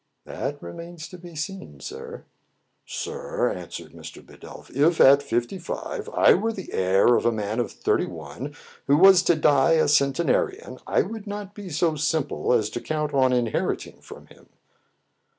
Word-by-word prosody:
"That - - -5
remains 165 - -8
to 180 - -10
be 175 -1 -12
seen, 190 +5 -6
sir." 460 +3 -8 0.6
"Sir," - - -3
answered - - -8
Mr. - - -11
Bidulph, - - -13
"if 160 +4 +3
at 140 +1 +7
fifty 120 +6 -2
five 430 - -5
I 485 - +5
were 225 - 0
the 195 -4 -8
heir 95 +6 +4
of - - +1
a 120 - +3
man 110 0 -3
of 120 - -1
thirty - - 0
one, 90 - -8 0.3
who 140 +1 +5
was 190 +1 +7
to 175 - +3
die 145 -1 +4
a 160 - +3
centenarian, 170 - +1
I 480 - +2
would 220 - -8
not 205 -1 -6
be 205 -3 -9
so 160 0 +1
simple 155 -1 -1
as 110 -3 +2
to 120 - -5
count 150 -1 -2
on 130 -2 +3
inheriting 120 -3 -1
from - - -12
him." - - -20
160 Hz, 170 wpm, -24 LUFS, 135-200 Hz, 0.6 s, at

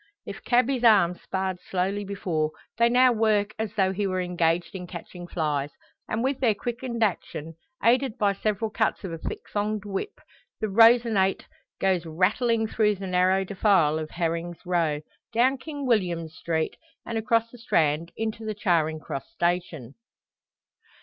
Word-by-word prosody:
If - - -8
cabby's 250 +1 +2
arms 195 -6 +5
sparred 190 -1 -3
slowly 190 +3 -1
before, 180 -6 -1 0.3
they 235 0 +5
now 250 +1 +5
work 215 -2 +1
as 220 -1 -3
though 190 -2 +2
he 200 +1 -1
were 185 -1 -1
engaged 175 -2 0
in 180 -2 -6
catching 175 0 -9
flies; 150 -4 -1 0.4
and 220 +2 -1
with 270 +1 0
their 230 -5 +3
quickened 240 +1 -3
action, 165 -5 -2 0.3
aided 250 +1 +3
by 205 -3 +2
several 215 +2 -2
cuts 220 0 0
of 190 - -5
a 165 - -6
thick - - -5
thonged 210 0 -1
whip, 205 - -4 0.4
the 215 - -1
Rosinante 225 -2 +4 0.3
goes 185 -3 +1
rattling 220 +8 +1
through 210 -1 +1
the 195 0 -7
narrow 185 +1 +2
defile 185 -6 +2
of 155 -1 -5
Heming's 170 0 -3
Row, 165 -4 0 0.3
down 255 +3 +3
King 290 -1 -6
William 180 -9 +1
Street, 160 -1 -2 0.3
and 230 - -4
across 225 +1 +1
the 245 - -13
Strand 165 -5 +1
into 220 0 -3
the 215 -1 -3
Charing 165 -6 +1
Cross 140 -2 -6
station. 175 - -2
195 Hz, 155 wpm, -26 LUFS, 175-225 Hz, 0.4 s, arms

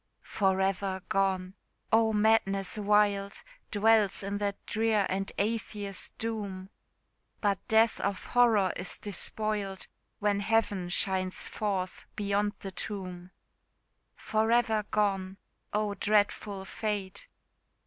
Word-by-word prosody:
For 190 -2 +1
ever 190 -1 -1
gone! 190 -1 +1 0.4
oh, 225 0 +4
madness 210 -3 +2
wild 205 -1 +2 0.4
Dwells 210 -2 +3
in 200 +1 -3
that 200 -1 -1
drear 220 -2 +1
and 195 +1 -2
Atheist 205 -2 -2
doom! 200 -4 -4 0.7
But 200 -3 +1
death 220 0 +4
of 200 -1 -2
horror 225 -6 +4
is 180 - -5
despoiled, 205 -1 -2 0.3
When 205 -1 +1
Heaven 205 -4 +1
shines 185 0 +1
forth 195 -3 -3
beyond 205 0 0
the 195 - -5
tomb. 185 -2 -5 0.9
For 220 +1 0
ever 225 -3 +2
gone! 195 -2 0 0.3
oh, 210 -1 0
dreadful 205 -1 +1
fate! 200 -2 -4
200 Hz, 105 wpm, -30 LUFS, 195-215 Hz, 0.9 s, oh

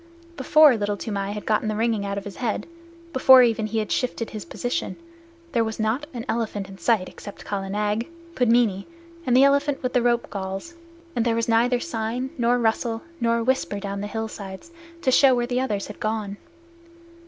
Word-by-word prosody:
Before 300 0 +6
Little 205 -1 -2
Toomai 200 -2 -3
had 210 - -6
got 215 -1 +2
the 215 -1 -2
ringing 220 -2 0
out 200 0 -3
of 200 - -4
his 200 -2 -9
head, 230 -4 -2 0.5
before 260 0 +8
even 225 -2 +1
he 225 - -3
had 215 -1 -1
shifted 245 -2 -1
his 215 -5 -6
position, 245 - -3 0.6
there 235 -4 +2
was 220 0 -4
not 225 +7 -1
an 235 -3 -6
elephant 215 -4 -2
in 195 0 -12
sight 185 +1 +2
except 205 - -11
Kala 195 -1 -3
Nag, 210 +3 -1 0.3
Pudmini, 230 - +2 0.4
and 250 0 +4
the 265 - +7
elephant 280 0 +2
with 255 - -1
the 250 - +3
rope 240 0 +1
galls, 195 - -5 0.4
and 235 - +1
there 230 -1 +1
was 230 0 0
neither 240 +2 +3
sign 245 -2 -3
nor 240 0 +2
rustle 225 0 0 0.2
nor 235 0 +1
whisper 255 -5 0
down 200 0 -4
the 205 - -3
hillsides 210 - -6 0.3
to 260 - +3
show 265 0 +6
where 240 0 0
the 250 +1 -1
others 210 -7 -2
had 210 - -10
gone. 215 -2 -2
225 Hz, 190 wpm, -24 LUFS, 205-245 Hz, 0.6 s, before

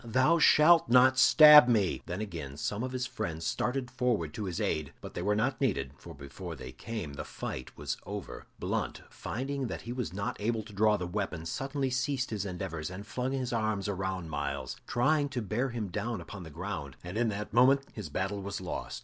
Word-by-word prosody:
"Thou 130 +8 +3
shalt 160 -1 +6
not 130 +2 +6
stab 150 -1 +9
me!" 110 -6 +2
Then 90 +4 -3
again 80 -9 -6
some 105 +7 -2
of 130 0 -3
his 130 -1 -2
friends 85 -11 -4
started 125 0 -1
forward 120 -11 0
to 105 - -4
his 90 -3 -3
aid, 75 -2 -1
but - - -9
they - - -4
were 105 +3 +1
not 130 +6 0
needed, 70 - 0
for - - -12
before 70 +5 -8
they 65 -2 -8
came, 105 - -6
the 70 - -5
fight 65 -1 -7
was - - -3
over. - - -7
Blunt, - - -3
finding 135 +2 -3
that - - -6
he 120 - -5
was 125 -9 -3
not 100 +4 -4
able 110 +1 0
to 105 0 -13
draw 105 +1 +3
the 90 - -3
weapon, 90 -3 -3
suddenly 135 - -2
ceased 130 0 -1
his 105 -2 -2
endeavors, 90 -4 -4
and 95 +3 -8
flung 125 +4 -2
his 130 -2 -2
arms 110 -3 0
around 95 -4 -3
Myles, 70 -3 -3
trying 145 +5 +2
to 135 -2 -3
bear 115 +7 -1
him 115 -5 -4
down 110 +5 -3
upon 100 - -9
the 80 - -9
ground, 80 -4 -5
and 90 +2 -7
in 115 0 +2
that 105 0 -5
moment 135 +4 +5
his 105 -8 -6
battle 95 +6 -2
was 100 +1 -4
lost. 90 -1 -5
105 Hz, 210 wpm, -30 LUFS, 90-125 Hz, -, stab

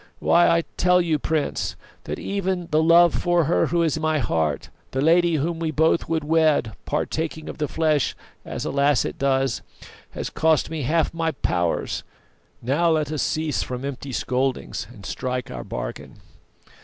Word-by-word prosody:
Why, 175 - +4
I 170 0 +3
tell 180 0 +4
you, 165 -4 +1
Prince, 155 0 -1 0.3
that - - -4
even 190 -3 -2
the 155 +1 +4
love 170 +1 +6
for 175 -1 +2
her 160 +4 +2
who 170 -1 +1
is 160 -1 0
my 155 0 +1
heart, 80 - -1 0.2
the 130 - -3
lady 170 +3 +4
whom 165 +3 -1
we 165 -1 -1
both 160 +2 +2
would 160 -2 0
wed, 155 -7 +2
partaking 155 +1 -2
of - - -7
the 150 - 0
flesh 155 -2 +1 0.3
as, - - -5
alas! 140 -2 +2
it - - -5
does, 135 -2 +1 0.5
has - - -5
cost 160 0 +2
me 160 -2 -3
half 155 +5 +1
my 165 -1 0
powers. 85 - -1 0.6
Now 145 +8 +2
let 155 -2 +1
us 155 - -1
cease 155 -2 -1
from 125 +1 -4
empty 140 0 -5
scoldings, 125 -4 -2
and 100 -5 -13
strike 125 -1 -3
our - - -6
bargain. - - -6
155 Hz, 170 wpm, -23 LUFS, 135-165 Hz, 0.6 s, love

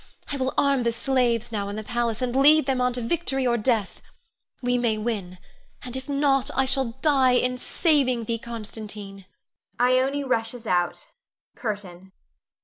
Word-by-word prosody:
I 285 - -2
will 260 0 -2
arm 280 -2 +3
the 235 -1 +1
slaves 240 -1 0
now 200 -2 -3
in 205 - -5
the 215 - -5
palace, 240 0 -2
and 250 0 -2
lead 295 +2 +6
them 260 -2 0
on 250 0 +2
to 245 - -3
victory 270 0 -1
or 240 -1 +2
death. 225 -3 0 0.6
We 245 -1 0
may 230 -3 +1
win 210 -5 -3 0.5
and 250 0 -6
if 260 +2 -6
not, 275 -2 +2
I 270 +1 +2
shall 260 -2 0
die 270 -5 +4
in 250 0 +1
saving 265 -7 +1
thee, 230 +1 -2
Constantine! 210 -4 -7 0.5
[Ione 260 +3 +2
rushes 230 -2 -1
out. 175 -3 -1 0.5
CURTAIN. 190 -4 -6
245 Hz, 160 wpm, -25 LUFS, 220-265 Hz, 0.6 s, lead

